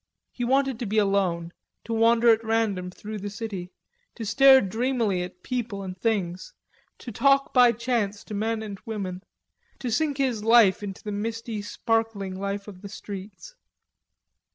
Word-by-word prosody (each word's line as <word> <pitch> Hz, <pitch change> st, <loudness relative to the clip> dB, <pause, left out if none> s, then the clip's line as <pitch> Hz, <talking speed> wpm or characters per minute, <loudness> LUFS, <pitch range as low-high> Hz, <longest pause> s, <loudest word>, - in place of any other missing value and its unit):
He 245 Hz, -, -5 dB
wanted 265 Hz, 0 st, +1 dB
to 235 Hz, -, -3 dB
be 215 Hz, +2 st, -1 dB
alone, 190 Hz, -5 st, +1 dB, 0.3 s
to 230 Hz, -, -4 dB
wander 230 Hz, +1 st, +4 dB
at 225 Hz, 0 st, +4 dB
random 220 Hz, -5 st, 0 dB
through 210 Hz, +3 st, -7 dB
the 205 Hz, +1 st, -5 dB
city, 200 Hz, -4 st, -6 dB, 0.4 s
to 225 Hz, -, -6 dB
stare 265 Hz, +5 st, +7 dB
dreamily 225 Hz, -2 st, 0 dB
at 180 Hz, 0 st, -8 dB
people 235 Hz, -5 st, -3 dB
and 185 Hz, -1 st, -6 dB
things, 190 Hz, -, -2 dB, 0.4 s
to 240 Hz, -, -8 dB
talk 275 Hz, +5 st, +3 dB
by 245 Hz, -2 st, +7 dB
chance 230 Hz, -3 st, -2 dB
to 215 Hz, -, -9 dB
men 220 Hz, +2 st, -1 dB
and 200 Hz, -2 st, -7 dB
women, 195 Hz, -5 st, -5 dB, 0.6 s
to 245 Hz, -, -4 dB
sink 290 Hz, +3 st, 0 dB
his 250 Hz, -6 st, 0 dB
life 225 Hz, -4 st, +5 dB
into 195 Hz, -2 st, -7 dB
the 210 Hz, -, -4 dB
misty 225 Hz, +1 st, -4 dB
sparkling 225 Hz, -2 st, -1 dB
life 200 Hz, +1 st, -4 dB
of 190 Hz, -3 st, -11 dB
the 200 Hz, -, -8 dB
streets. 200 Hz, -, -9 dB
215 Hz, 160 wpm, -26 LUFS, 195-235 Hz, 0.6 s, stare